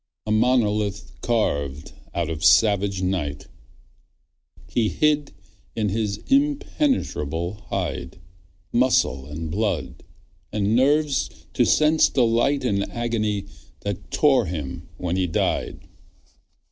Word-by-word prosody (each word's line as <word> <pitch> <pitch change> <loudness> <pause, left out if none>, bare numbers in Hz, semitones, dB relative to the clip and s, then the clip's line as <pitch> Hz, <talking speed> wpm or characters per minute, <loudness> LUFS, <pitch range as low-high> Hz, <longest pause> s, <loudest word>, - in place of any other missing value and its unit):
A 110 - -2
monolith 105 -4 +1
carved 70 - -1 0.2
out 85 -2 0
of 80 0 -5
savage 100 +2 +4
night, 80 -7 -2 1.2
He 110 -3 +1
hid 150 -1 +1 0.4
in 110 -2 0
his 105 0 -1
impenetrable 180 - 0
hide 90 -5 -3 0.5
Muscle 95 - +2
and 75 +2 -5
blood, 85 - -2 0.5
and 105 +1 +1
nerves 145 +2 +2 0.2
to - - +3
sense 155 +1 +4
delight 125 +3 +2
And 100 -4 0
agony 110 -4 -1 0.4
that 100 -2 -5
tore 135 - +3
him 85 +1 -5
when 90 +1 -2
he 95 -1 +1
died. 80 - -2
105 Hz, 105 wpm, -23 LUFS, 85-125 Hz, 1.2 s, savage